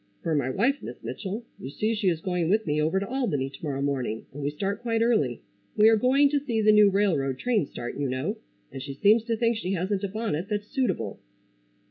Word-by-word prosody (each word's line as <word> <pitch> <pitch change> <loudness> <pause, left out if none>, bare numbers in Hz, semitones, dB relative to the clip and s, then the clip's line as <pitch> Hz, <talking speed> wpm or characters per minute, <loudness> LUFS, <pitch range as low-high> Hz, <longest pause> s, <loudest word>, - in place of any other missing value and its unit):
"For 165 - 0
my 140 -4 +1
wife, 255 - +1
Miss - - -7
Mitchell. 215 +4 -5
You 130 - -6
see 215 +10 -1
she 210 -3 +1
is 165 -2 -1
going 180 -3 -1
with 215 +3 +2
me 150 -1 0
over 160 +5 +1
to 200 - -4
Albany 190 - -1
to - - -14
morrow 140 -3 -2
morning 130 -6 -2
and 145 - -7
we 140 - 0
start 195 +8 -3
quite 230 -1 +1
early. 150 - +1 0.4
We 215 +1 +7
are 225 - +6
going 260 +6 +4
to 290 - +2
see 245 -6 -2
the 215 0 +5
new 210 -1 +7
railroad 165 -10 +1
train 215 - +1
start, 120 - -6
you 140 -2 0
know, 140 - -2 0.3
and 135 - -7
she 135 0 -6
seems 215 +8 +4
to 230 -1 -1
think 230 0 +1
she 195 -3 -2
hasn't 190 +2 -1
a - - +1
bonnet 195 -4 -3
that's 210 -1 -2
suitable." 210 - -2
195 Hz, 230 wpm, -26 LUFS, 145-225 Hz, 0.4 s, We